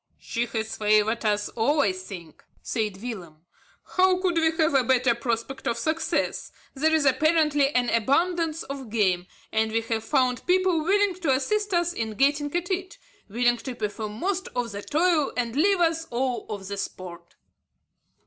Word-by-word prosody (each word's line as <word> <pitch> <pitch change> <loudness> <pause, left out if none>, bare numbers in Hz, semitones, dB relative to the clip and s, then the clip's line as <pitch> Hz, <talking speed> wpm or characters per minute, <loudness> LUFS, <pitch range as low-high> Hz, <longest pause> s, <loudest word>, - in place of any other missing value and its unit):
"She 235 0 -3
has 220 -1 -4
favoured 215 +2 +2
us 210 -1 +1
all 280 +7 +1
I 200 - +2
think," 185 -4 -10 0.2
said 210 -3 -3
Willem. 175 -10 -7 0.6
"How 370 0 +4
could 370 -2 +1
we 325 -1 +3
have 315 -2 +2
a 270 -2 +4
better 250 0 +3
prospect 235 +2 -3
of 235 - 0
success? 315 +3 -1 0.2
There 310 +3 +1
is 315 -2 +2
apparently 300 0 +3
an 245 -1 +2
abundance 325 +7 +1
of 270 -3 -7
game; 185 -5 +1 0.2
and 220 0 +1
we 225 +1 +1
have 225 -1 -3
found 250 +1 0
people 365 -3 +2
willing 400 +2 +2
to 325 - 0
assist 415 +10 -1
us 345 0 +1
in 220 -5 -4
getting 290 +3 +2
at 350 +2 -2
it, 375 +4 -3 0.3
willing 240 +3 +2
to 245 +2 -7
perform 215 -1 -4
most 380 +2 -1
of 245 -2 -2
the 200 0 -6
toil 315 - +1
and 235 -1 -1
leave 385 +6 +3
us 325 -1 +1
all 250 0 -2
of 200 -3 -6
the 200 0 -5
sport." 175 -3 -7
255 Hz, 170 wpm, -25 LUFS, 220-325 Hz, 0.6 s, How